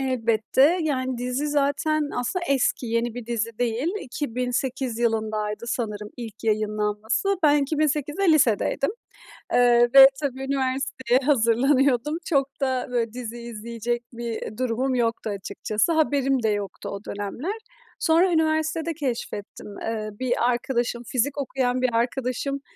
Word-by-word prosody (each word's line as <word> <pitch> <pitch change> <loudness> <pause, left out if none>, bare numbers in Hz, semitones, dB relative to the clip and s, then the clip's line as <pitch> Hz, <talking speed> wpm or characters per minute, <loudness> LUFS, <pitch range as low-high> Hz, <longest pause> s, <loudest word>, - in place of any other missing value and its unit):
Elbette, 260 +5 +2
yani, 260 -5 -1
dizi 250 +4 -2
zaten, 290 +1 +1
aslında, 295 +9 -2
eski, 265 -2 +1
yeni 230 0 -1
bir 245 -2 -7
dizi 230 -1 -3
değil. 245 +5 0
2008 250 -1 -2
yılındaydı, 220 -2 -1
sanırım, 210 -3 -3
ilk 230 -3 -8
yayınlanması. 215 - 0
Ben 295 -1 +5
2008'de 305 +4 +1
lisedeydim, 270 - +2 0.6
eee, 240 -1 +5
ve, 270 0 +11
tabii, 265 -2 -3
üniversiteye 265 -2 0
hazırlanıyordum. 270 +2 +3
Çok 275 -4 +1
da, 260 -2 0
böyle, 230 -2 -1
dizi 240 -1 -6
izleyecek 235 +1 -4
bir 230 -2 -5
durumum 255 +1 0
yoktu, 230 -2 0
açıkçası. 210 - -1
Haberim 275 -5 +2
de 220 - +3
yoktu 205 -3 -3
o 200 - -5
dönemler. 235 - -4 0.4
Sonra 350 +2 +3
üniversitede 315 +1 +1
keşfettim. 235 -7 -5
Eee, 220 -1 -3
bir 255 -1 +1 0.2
arkadaşım, 240 -1 -1
fizik 255 +4 -1
okuyan 255 -2 -1
bir 255 - +3
arkadaşım 255 +3 -1
250 Hz, 125 wpm, -24 LUFS, 230-280 Hz, 0.6 s, ve